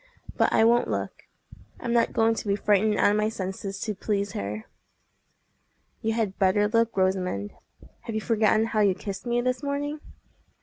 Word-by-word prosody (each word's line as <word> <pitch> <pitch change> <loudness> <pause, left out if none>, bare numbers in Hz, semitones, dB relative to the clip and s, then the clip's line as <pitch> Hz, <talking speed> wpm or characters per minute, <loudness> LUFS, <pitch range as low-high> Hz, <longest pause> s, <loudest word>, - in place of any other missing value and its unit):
But - - +2
I - - +4
won't 235 +1 +4
look. - - -4 0.5
I'm 235 -1 -2
not 235 -1 +3
going 225 0 +3
to 220 - -5
be 200 - +2
frightened 210 +1 +2
out - - +4
of 210 - +1
my 215 0 +1
senses 195 -2 -5
to 215 - -2
please 200 0 -2
her." 105 - -5 1.4
"You 225 0 0
had 220 -4 -2
better 200 +2 +3
look, 230 +1 +1
Rosamond. 185 - 0 0.5
Have 225 - -4
you 220 - -1
forgotten 220 -1 +2
how 225 -1 -1
you 200 -3 +3
kissed 200 +4 -6
me 240 0 +1
this 255 +1 -1
morning?" 290 +1 -3
215 Hz, 175 wpm, -26 LUFS, 195-230 Hz, 1.4 s, I